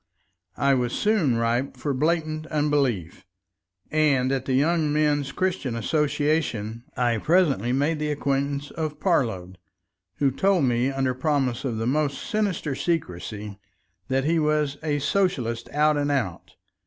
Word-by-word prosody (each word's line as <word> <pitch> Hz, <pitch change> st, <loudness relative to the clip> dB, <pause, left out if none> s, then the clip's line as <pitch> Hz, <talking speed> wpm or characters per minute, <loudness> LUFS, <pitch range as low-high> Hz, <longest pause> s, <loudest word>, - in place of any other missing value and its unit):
I 140 Hz, 0 st, +3 dB
was 125 Hz, -2 st, 0 dB
soon 205 Hz, -, +2 dB
ripe 120 Hz, +4 st, 0 dB
for 145 Hz, -, -2 dB
blatant 155 Hz, +2 st, 0 dB
unbelief. 145 Hz, -, 0 dB, 0.7 s
And 140 Hz, -4 st, +2 dB
at 135 Hz, -1 st, -1 dB
the 130 Hz, -, 0 dB
Young 155 Hz, +2 st, +2 dB
Men's 145 Hz, -2 st, +1 dB
Christian 180 Hz, -8 st, -1 dB
Association 145 Hz, -4 st, -1 dB
I 120 Hz, -2 st, +1 dB
presently 150 Hz, -, +2 dB
made 145 Hz, +4 st, +1 dB
the 150 Hz, 0 st, -1 dB
acquaintance 140 Hz, 0 st, -1 dB
of 155 Hz, -2 st, -4 dB
Parload, 110 Hz, -, 0 dB, 0.6 s
who 140 Hz, -2 st, +2 dB
told 190 Hz, +4 st, +2 dB
me, 125 Hz, 0 st, +2 dB
under 135 Hz, -1 st, 0 dB
promises 130 Hz, -2 st, 0 dB
of -, -, -4 dB
the 115 Hz, -, -2 dB
most 140 Hz, +2 st, 0 dB
sinister 200 Hz, -9 st, -1 dB
secrecy, 105 Hz, -, -3 dB, 0.5 s
that 135 Hz, 0 st, +1 dB
he 165 Hz, +3 st, +2 dB
was 150 Hz, -2 st, +1 dB
"a 150 Hz, -2 st, 0 dB
Socialist 135 Hz, -, 0 dB
out 150 Hz, 0 st, +2 dB
and 145 Hz, 0 st, 0 dB
out." 115 Hz, -12 st, -3 dB
140 Hz, 140 wpm, -25 LUFS, 125-155 Hz, 0.7 s, I